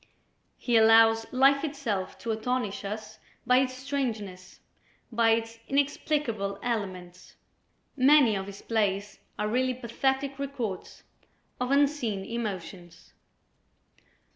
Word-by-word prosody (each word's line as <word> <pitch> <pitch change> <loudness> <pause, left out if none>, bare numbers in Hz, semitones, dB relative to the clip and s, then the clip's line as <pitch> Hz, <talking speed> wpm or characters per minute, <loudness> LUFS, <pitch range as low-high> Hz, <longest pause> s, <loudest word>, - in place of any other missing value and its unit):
He 240 -2 +1
allows 225 0 +5
life 275 +2 +4
itself 270 -11 -3
to 230 - -2
astonish 220 -1 -2
us 215 +1 -6 0.3
by 250 +1 +4
its 260 -1 0
strangeness, 230 -9 -4 0.5
by 230 0 +3
its 225 0 0
inexplicable 275 -7 -1
elements. 185 -6 -5 0.6
Many 270 -4 +5
of 195 0 -4
his 200 0 -10
plays 205 -2 -1 0.2
are 210 - -1
really 255 +3 0
pathetic 265 +3 -2
records 255 -9 -5 0.6
of 250 0 -1
unseen 275 -8 +1
emotions. 190 -6 -6
230 Hz, 105 wpm, -28 LUFS, 205-265 Hz, 0.6 s, allows